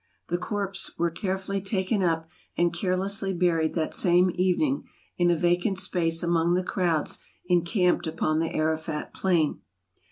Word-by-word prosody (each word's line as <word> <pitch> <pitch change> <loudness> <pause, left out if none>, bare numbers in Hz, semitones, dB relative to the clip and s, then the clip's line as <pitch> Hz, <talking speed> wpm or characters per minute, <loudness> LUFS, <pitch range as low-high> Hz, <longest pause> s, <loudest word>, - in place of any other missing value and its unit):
The 175 +1 0
corpses 195 -1 -3
were 170 0 +1
carefully 190 +2 -2
taken 195 +1 0
up, 165 -2 0 0.3
and 175 -1 +2
carelessly 195 +2 -1
buried 170 -3 +1
that 160 -2 -1
same 180 0 +4
evening, 190 - +1 0.3
in 175 0 +4
a 175 - +4
vacant 175 +4 +1
space 165 -3 0
among 170 0 +2
the 185 - +1
crowds 175 -5 0 0.3
encamped 180 0 +2
upon 155 -1 0
the 165 0 -1
Arafat 160 0 -2
plain. 170 -6 +1
175 Hz, 140 wpm, -26 LUFS, 165-190 Hz, 0.3 s, same